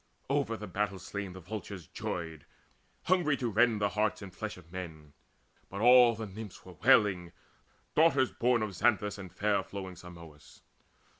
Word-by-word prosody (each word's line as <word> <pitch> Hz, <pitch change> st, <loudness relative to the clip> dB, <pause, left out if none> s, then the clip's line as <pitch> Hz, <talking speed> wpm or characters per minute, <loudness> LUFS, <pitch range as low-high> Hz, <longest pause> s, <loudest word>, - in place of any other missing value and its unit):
Over 140 Hz, -5 st, 0 dB
the 105 Hz, -, -7 dB
battle 100 Hz, 0 st, -2 dB
slain 100 Hz, +1 st, -6 dB
the 95 Hz, -, -9 dB
vultures 95 Hz, -1 st, -7 dB
joyed, 80 Hz, -1 st, -5 dB, 0.6 s
Hungry 170 Hz, -6 st, +2 dB
to 120 Hz, -3 st, -2 dB
rend 115 Hz, 0 st, +3 dB
the 100 Hz, -1 st, +1 dB
hearts 105 Hz, 0 st, -1 dB
and 95 Hz, -2 st, -9 dB
flesh 110 Hz, +2 st, -5 dB
of 85 Hz, -2 st, -16 dB
men. 80 Hz, -5 st, -8 dB, 0.6 s
But 100 Hz, +2 st, -5 dB
all 120 Hz, 0 st, +7 dB
the 110 Hz, 0 st, -5 dB
Nymphs 105 Hz, -1 st, -9 dB
were 90 Hz, -, -11 dB
wailing, 95 Hz, -5 st, +3 dB, 0.6 s
daughters 140 Hz, -5 st, +4 dB
born 120 Hz, -1 st, +2 dB
Of 105 Hz, -2 st, -4 dB
Xanthus 105 Hz, +1 st, +1 dB
and 95 Hz, -2 st, -8 dB
fair 100 Hz, +1 st, +1 dB
flowing 95 Hz, -1 st, -7 dB
Simois. 85 Hz, -4 st, -13 dB
100 Hz, 160 wpm, -31 LUFS, 90-115 Hz, 0.6 s, all